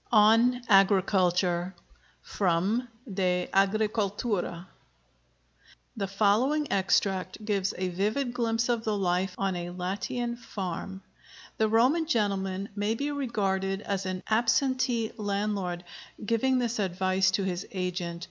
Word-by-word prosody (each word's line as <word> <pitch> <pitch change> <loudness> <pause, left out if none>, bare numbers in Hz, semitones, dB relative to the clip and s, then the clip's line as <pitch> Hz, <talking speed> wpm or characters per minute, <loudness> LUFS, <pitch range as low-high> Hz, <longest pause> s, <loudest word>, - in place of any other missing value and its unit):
ON 230 +3 +5
AGRICULTURE 190 -2 +3 0.5
From 195 +6 0 0.3
'De 180 -2 0
Agricultura.' 205 -2 0 1.3
[The 200 -3 -2
following 220 +10 +2
extract 190 +1 0
gives 200 -3 0
a 185 0 -1
vivid 215 +8 -1
glimpse 230 -1 0
of 235 -2 0
the 215 -2 0
life 185 0 0
on 195 -1 -1
a 175 0 -4
Latian 200 +7 -3
farm. 195 -4 -6 0.6
The 220 0 +3
Roman 260 +9 +3
gentleman 195 - -1
may 205 +2 0
be 285 +4 -2
regarded 195 -8 -1
as 195 -2 -2
an 185 0 -4
"absentee 235 +1 +1
landlord," 200 -4 -2 0.4
giving 245 +4 +2
this 240 -2 -1
advice 185 0 +1
to 200 - -1
his 180 -1 -3
agent. 180 -2 -3
200 Hz, 115 wpm, -28 LUFS, 185-230 Hz, 1.3 s, ON